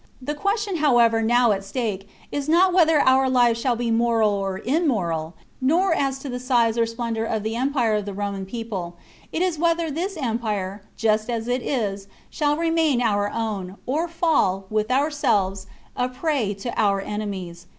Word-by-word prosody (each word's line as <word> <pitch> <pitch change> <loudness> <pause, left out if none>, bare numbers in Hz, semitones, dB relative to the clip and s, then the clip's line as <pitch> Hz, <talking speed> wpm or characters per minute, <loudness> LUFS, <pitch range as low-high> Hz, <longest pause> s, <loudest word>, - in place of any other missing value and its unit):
The 270 +3 -3
question, 400 +4 -1
however, 240 -7 +4
now 240 +1 +3
at 195 -1 -1
stake 200 -2 -3 0.2
is 285 +1 -3
not 360 +3 +4
whether 325 -4 +5
our 260 0 +4
lives 240 -2 +3
shall 250 -1 +1
be 235 0 -1
moral 225 -2 +3
or 195 -2 -2
immoral, 195 - 0 0.3
nor 335 +7 +3
as 275 -4 0
to - - -3
the 250 -1 -4
size 240 -3 +2
or 230 -1 +2
splendour 230 -1 -3
of 220 -2 -2
the 220 +1 -2
empire 250 -3 +1
of 210 -1 0
the 200 - -5
Roman 200 -1 -3
people; 195 -6 -5 0.4
it 335 - 0
is 355 -4 -1
whether 335 -1 +1
this 350 +5 -3
empire, 215 -7 -2 0.2
just 215 0 +1
as 230 -1 -2
it 250 +1 0
is, 200 -7 -2 0.2
shall 295 -1 0
remain 325 -5 +2
our 205 -4 +1
own, 205 -5 -4
or 310 +7 0
fall, 310 - +1
with 215 +1 0
ourselves, 215 -9 +1 0.3
a 250 0 0
prey 255 -6 -1
to 230 +5 -5
our 200 -2 +2
enemies. 190 -4 -5
235 Hz, 175 wpm, -23 LUFS, 205-285 Hz, 0.4 s, whether